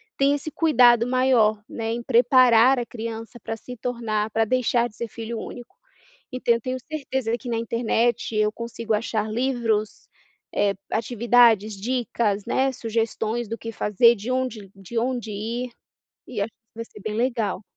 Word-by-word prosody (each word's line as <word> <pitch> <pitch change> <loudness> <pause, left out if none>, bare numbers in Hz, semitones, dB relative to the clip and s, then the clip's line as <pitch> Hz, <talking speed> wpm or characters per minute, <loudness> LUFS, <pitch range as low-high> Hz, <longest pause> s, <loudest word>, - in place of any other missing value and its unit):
Tem 280 +1 +3
esse 290 +2 -6
cuidado 245 -7 +4
maior, 250 -4 +3
né, 225 -1 -4
em 235 +1 -3
preparar 245 +1 +5
a 240 - -2
criança 230 +1 -7
para 225 - -5
se 250 +3 -9
tornar 225 -3 -2
para 225 +1 +1
deixar 240 0 +1
de 215 - -19
ser 235 - -4
filho 225 0 -6
único. 245 +10 -9 0.6
Então 250 -2 +2
eu 235 - -4
tenho 255 +2 -3
certeza 265 -6 -2
que 245 - -8
na 230 - 0
internet 230 0 0
eu 215 0 +2
consigo 230 0 -4
achar 215 0 -1
livros, 225 -4 -1 0.5
eh, 200 -1 +2 0.2
atividades, 230 -2 +3
dicas, 230 -3 -1
né, 270 +1 +1
sugestões 225 0 -2
do 230 - -3
que 230 - -6
fazer 225 +2 +4
de 220 +4 -5
onde 245 -6 -3
de 195 +4 -4
onde 240 -2 -2
ir. 230 +4 -4 0.6
E, 220 -5 -4
é, - - +2 0.3
vai 230 0 -6
ser 210 - -14
bem 210 +1 -4
legal. 230 -5 -1
230 Hz, 160 wpm, -24 LUFS, 220-245 Hz, 0.6 s, preparar